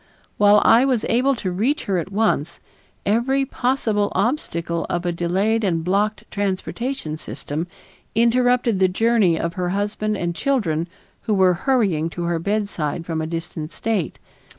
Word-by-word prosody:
While 205 0 +6
I 230 +3 +6
was 255 -5 +1
able 265 +4 +3
to 190 -6 -3
reach 230 +12 0
her 190 -3 0
at 180 +3 -5
once, 195 -6 0 0.5
every 255 +6 +2
possible 240 -6 0
obstacle 170 - -1
of 175 0 -2
a 175 - +1
delayed 190 +7 0
and 165 -5 0
blocked 205 +4 0
transportation 200 - -3
system 145 +6 -5 0.5
interrupted 235 -1 +3
the 190 - +5
journey 200 -3 +2
of 170 0 -2
her 180 0 -2
husband 205 +2 -1
and 175 -2 -2
children 170 - 0 0.4
who 215 -3 +1
were 185 -2 +4
hurrying 190 - +1
to 175 - -2
her 170 -1 0
bedside 180 -5 -2
from 160 -2 -2
a 155 - -3
distant 165 -1 -5
state. 215 -7 -2
200 Hz, 150 wpm, -22 LUFS, 170-230 Hz, 0.5 s, While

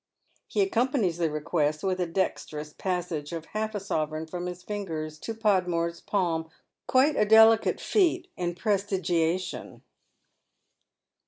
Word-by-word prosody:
He - - 0
accompanies 245 - +1
the 165 -2 +2
request 150 0 -1
with 185 -1 0
a 180 - 0
dexterous 155 -4 -3
passage 175 -5 -3
of 165 -1 -5
half 215 0 -2
a - - -1
sovereign 155 -5 -2
from 175 +2 -5
his 180 0 -7
fingers 160 -7 -5
to 225 - -5
Podmore's 180 -6 +1
palm 165 -5 -1 0.2
— - - -58
quite 275 +3 +4
a 210 - +3
delicatft 220 +1 +6
feat 360 -3 +2
in 175 -1 -2
prestigiation. 185 -4 -1
180 Hz, 135 wpm, -27 LUFS, 165-210 Hz, 0.2 s, delicatft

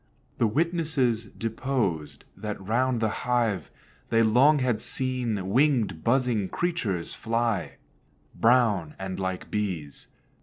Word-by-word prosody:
The 115 - +4
witnesses 145 -5 +1
deposed 110 - -3
that 105 0 -5
round 120 +5 0
the 110 - +2 0.2
hive 115 -8 +1 0.4
They 115 0 +4
long 130 +8 +5
had 125 -5 0
seen 120 -6 -2
wing'd, 125 - +2
buzzing 120 -5 +1
creatures 120 - -2
fly, 115 -4 -1 0.6
Brown, 110 -9 +3
and 95 0 -5
like 95 -1 -4
bees. 90 -9 -3
115 Hz, 110 wpm, -27 LUFS, 100-130 Hz, 0.6 s, long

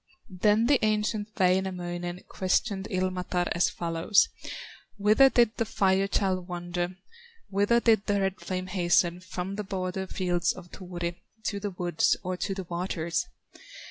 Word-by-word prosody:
Then 215 +2 +4
the 265 -2 +3
ancient 215 0 +1
Wainamoinen 180 -1 0
Questioned 190 +1 0
Ilmatar 185 -2 -1
as 170 - +3
follows: 170 +4 +2 0.7
"Whither 215 +7 +6
did 235 -2 +3
the 230 - +1
Fire 195 -1 +2
child 185 -3 0
wander, 175 0 -3 0.5
Whither 205 +4 +3
did 220 -3 +3
the 205 -1 +2
red 195 -1 -1
flame 185 -1 -3
hasten, 175 -1 +2
From 185 +1 -5
the 210 - -2
border 190 -1 -3
fields 175 -3 0
of 175 -2 -12
Turi, 175 -2 -5 0.3
To 205 -2 -2
the 205 0 -3
woods, 175 -3 +1
or 185 0 -2
to 195 +2 -3
the 190 - -4
waters?" 170 -1 -2
185 Hz, 140 wpm, -28 LUFS, 175-205 Hz, 0.7 s, Whither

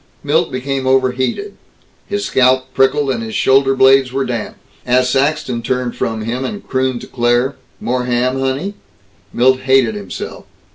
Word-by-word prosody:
Milt 160 +4 +1
became 130 +1 -3
overheated. 130 - 0 0.5
His 205 0 -2
scalp 130 0 +2
prickled 135 +1 +2
and 120 -3 -2
his 110 -1 -6
shoulder 135 0 +3
blades 130 0 +5
were 135 +1 -1
damp. 120 -3 -4 0.3
As 125 +1 +2
Saxton 140 -3 0
turned 125 0 -2
from 110 -1 -2
him, 120 +4 -3
and 205 +9 -6
crooned 130 -2 -1
to - - -9
Claire, 120 +2 +1 0.2
"More 125 +1 -1
ham, 125 +2 0
honey?" 135 +9 -2 0.6
Milt 130 +2 +3
hated 130 -3 +3
himself. 100 -3 -7
130 Hz, 150 wpm, -16 LUFS, 125-135 Hz, 0.6 s, blades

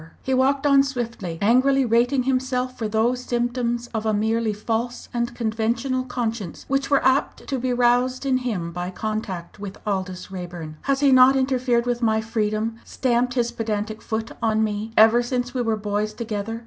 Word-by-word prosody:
He 265 - -1
walked 270 +2 +2
on 280 -1 +6
swiftly, 235 -10 -4
angrily 260 +5 +4
rating 245 +3 +2
himself 255 -1 -1
for 220 - -3
those 225 +4 +1
symptoms 240 -1 -1
of 220 -1 -2
a 220 -1 +1
merely 220 +1 +1
false 225 +3 -3
and 240 0 -2
conventional 235 +3 -1
conscience 230 -7 -4
which 275 0 0
were 280 -2 +3
apt 260 +2 +1
to 270 -2 -2
be 255 +1 -1
roused 245 +2 +2
in 265 -1 +2
him 200 -10 -3
by 175 +1 -4
contact 200 -3 -5
with 200 -1 -7
Aldous 190 -2 -3
Raeburn. 175 -4 -7
"Has 275 0 +2
he 280 -1 +5
not 260 +1 +7
interfered 255 -2 +1
with 245 0 -1
my 220 -2 +2
freedom 220 0 -1
stamped 245 0 0
his 240 -2 +1
pedantic 220 -1 -3
foot 220 0 -3
on 220 -1 +2
me 215 +1 -2
ever 225 +2 +7
since 245 0 -2
we 255 - -1
were 225 -2 0
boys 210 +1 -2
together! 225 -1 -4
235 Hz, 175 wpm, -23 LUFS, 215-255 Hz, -, not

